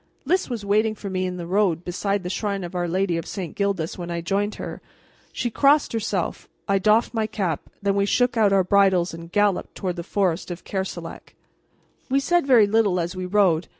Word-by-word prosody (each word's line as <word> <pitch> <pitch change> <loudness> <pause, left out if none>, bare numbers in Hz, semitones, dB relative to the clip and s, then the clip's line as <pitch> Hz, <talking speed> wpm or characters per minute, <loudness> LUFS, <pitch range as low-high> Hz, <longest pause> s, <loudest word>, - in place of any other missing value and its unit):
Lys 365 +4 +1
was 230 -5 -4
waiting 215 +2 +2
for 200 -2 -7
me 185 0 -1
in 180 0 -5
the 175 - -5
road 180 -2 +1
beside 195 +2 -1
the 180 - -4
Shrine 200 -2 -2
of 175 - -7
Our 175 -1 -1
Lady 180 0 0
of 165 - -5
St. 185 -5 -6
Gildas 195 -5 -1
when 175 -1 -5
I 170 0 -2
joined 200 +5 -1
her. - - -7 0.5
She 240 - -2
crossed 285 +3 +3
herself, 210 -5 -2 0.2
I 195 0 +2
doffed 215 +5 +3
my 220 -2 0
cap, 190 -8 -3
then 200 -1 +2
we 200 0 +1
shook 245 +3 +2
out 215 -3 +4
our 195 -1 +4
bridles 190 -2 +3
and 165 0 -9
galloped 205 -1 +1
toward 180 -2 -3
the - - -3
forest 185 -2 -1
of 175 0 -6
Kerselec. 190 -1 -6 0.7
We 270 +1 +3
said 345 +1 +1
very 240 -6 +6
little 205 -3 +2
as 175 +2 -3
we 185 0 -4
rode. 180 -4 +2
195 Hz, 210 wpm, -23 LUFS, 180-215 Hz, 0.7 s, very